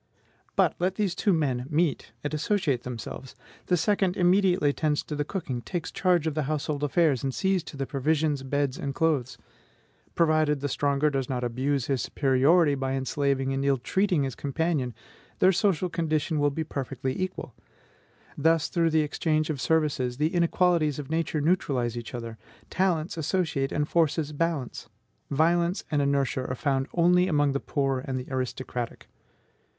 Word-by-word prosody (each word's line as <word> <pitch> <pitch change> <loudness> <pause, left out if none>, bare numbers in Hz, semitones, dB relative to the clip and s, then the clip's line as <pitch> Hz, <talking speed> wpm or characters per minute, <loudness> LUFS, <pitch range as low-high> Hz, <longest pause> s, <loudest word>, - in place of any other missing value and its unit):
But - - +3
let 180 +2 0
these 200 -4 0
two 200 +3 +1
men 135 -7 0
meet 160 -1 0
and 145 - -3
associate 155 - 0
themselves: 125 +1 -7 0.3
the 180 - +3
second 195 0 +1
immediately 180 -3 +3
attends 150 0 0
to 150 - -5
the 145 - 0
cooking, 145 -8 -4
takes 175 +6 -4
charge 180 -3 +2
of 160 - 0
the 155 - -1
household 150 -1 -2
affairs, 145 -3 +2
and 135 - 0
sees 190 +6 +1
to 145 - -9
the 135 - -2
provisions, 150 +1 0
beds, 140 0 -1
and 140 -1 -4
clothes; 135 -7 0 0.8
provided 155 -3 +3
the 145 - -2
stronger 145 +2 +1
does 135 -2 -2
not 125 -2 -2
abuse 130 +2 -1
his 135 -4 0
superiority 145 +5 +3
by 135 -1 -2
enslaving 135 0 0
and 135 0 -1
ill 140 -1 +2
treating 180 - +1
his 135 -2 -2
companion, 140 -3 -1 0.4
their 185 - +5
social 185 -2 +1
condition 160 -2 -1
will 145 0 +3
be 160 +3 -3
perfectly 135 -3 -4
equal. 185 -9 -4 0.8
Thus, 160 +1 +2
through 170 -2 +1
exchange 155 0 +1
of 140 -4 -4
services, 145 -6 +1
the 155 +5 0
inequalities 170 -3 +2
of 145 -1 -7
Nature 160 -2 0
neutralize 140 -8 0
each 120 +1 -6
other, 115 -2 -7 0.3
talents 175 -3 0
associate, 160 -4 -1
and 150 0 0
forces 160 -2 +1
balance. 155 -4 -2 0.4
Violence 170 +5 +2
and 145 -1 +2
inertia 140 -2 0
are 130 - -3
found 135 0 0
only 180 +1 +4
among 145 -4 +2
the 140 - -1
poor 135 -2 -1
and 130 0 -3
the 125 - -7
aristocratic. 130 -2 -4
150 Hz, 165 wpm, -27 LUFS, 135-165 Hz, 0.8 s, their